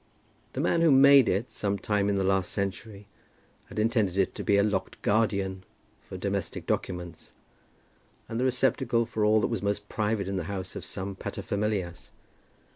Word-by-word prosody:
The - - -2
man 165 - +2
who 165 - +5
had 135 - +6
made 140 -2 +7
it, 100 +7 -1
some 100 -1 -1
time 105 0 0
in 100 - +1
the 95 - +1
last 95 -1 +1
century, 100 +1 -4 0.6
had - - -12
intended 105 -4 +1
it 95 - +1
to - - -6
be 100 - +3
a 100 - +4
locked 100 -3 -2
guardian 100 -3 0 0.5
for - - -6
domestic - - -3
documents, 90 -2 -4 0.9
and 115 - -4
the 130 - +1
receptacle 125 -2 +1
for 110 -2 -2
all 105 +1 +4
that - - +1
was 110 - -2
most 105 0 -2
private 105 -2 -1
in 100 0 -2
the 90 - -3
house 95 0 -5
of - - -6
some 95 0 -5
paterfamilias. 100 -3 -3
100 Hz, 180 wpm, -28 LUFS, 95-110 Hz, 0.9 s, made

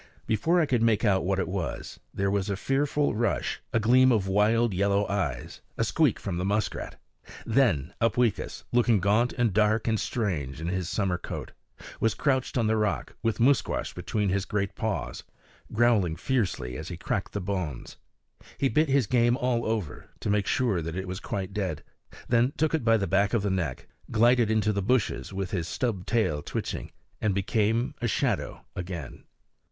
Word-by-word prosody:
Before 160 - +2
I 165 - +4
could 125 -5 +1
make 115 -1 +3
out 95 -4 +2
what 95 +1 +1
it 95 - -1
was, 95 -3 -4
there 100 0 -1
was 100 0 0
a 100 - 0
fearful 145 +6 0
rush, 115 +2 -1
a 115 - +2
gleam 130 +4 +5
of 105 -5 +1
wild 105 +3 +3
yellow 100 +2 +1
eyes, 95 -11 -3 0.2
a - - +2
squeak - - +2
from 90 -3 -4
the 90 - -1
muskrat. 105 +3 -2 0.5
Then 110 - +2
Upweekis, 115 0 0
looking 120 -3 +3
gaunt 105 +6 +2
and 120 -5 +1
dark 110 +2 +2
and 110 -2 +1
strange 80 - -2
in 80 +2 -3
his 90 -1 -2
summer 95 -4 0
coat, - - -6 0.5
was 115 -1 +1
crouched 135 -3 0
on 115 - +2
the 110 0 +2
rock 105 -2 -1
with 115 -1 -1
Musquash 130 +2 +2
between 105 -2 -1
his 95 +1 0
great 100 -1 -2
paws, 110 -2 -3 0.5
growling 110 -8 +3
fiercely 90 - -1
as - - -6
he - - -6
cracked - - -3
the 100 - -1
bones. 90 -9 -4 0.6
He 135 - +2
bit 155 +1 +2
his 135 -3 +3
game 120 +2 +3
all 125 -4 0
over, 110 -8 -3
to 105 - -1
make 105 -1 +1
sure 115 -9 +1
that 80 +1 -5
it 95 0 -4
was 90 +1 -4
quite 95 -1 -4
dead, 95 -7 -3 0.4
then 120 +3 +3
took 160 0 +1
it 160 - +1
by 115 -1 +4
the 100 - -1
back 100 +3 +2
of 110 - +1
the 100 - 0
neck, 85 -9 -2 0.2
glided 120 0 +4
into 105 -1 +2
the 100 - -1
bushes 105 - 0
with 95 0 -4
his 85 -5 -2
stub 110 -6 -2
tail 110 -11 +1
twitching, - - -4 0.3
and 105 -3 +1
became 110 +6 +1
a 120 - +1
shadow - - -1
again. 85 -6 -6
105 Hz, 185 wpm, -27 LUFS, 95-120 Hz, 0.6 s, gleam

